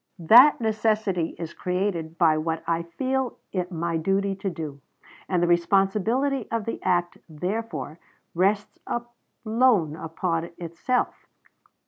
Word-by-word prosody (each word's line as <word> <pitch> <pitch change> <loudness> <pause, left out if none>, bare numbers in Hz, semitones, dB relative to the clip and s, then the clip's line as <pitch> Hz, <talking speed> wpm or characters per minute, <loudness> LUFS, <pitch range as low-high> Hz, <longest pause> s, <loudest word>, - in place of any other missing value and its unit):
That 235 - +7
necessity 215 -6 0
is 165 -1 -6
created 180 -3 -2
by 165 -3 +4
what 160 +1 -2
I 165 0 0
feel 255 +9 -2
it 180 -1 -3
my 170 -1 -1
duty 195 +4 0
to 195 0 -2
do; 155 -5 -7 0.5
and 180 -2 +1
the - - +3
responsibility 205 +9 +2
of 230 -2 -2
the 230 - -4
act, 175 -1 0
therefore, 180 +1 -4 0.3
rests 200 +4 0
alone 235 - 0
upon 165 +1 -3
myself." 175 +9 -2
185 Hz, 120 wpm, -25 LUFS, 165-220 Hz, 0.5 s, That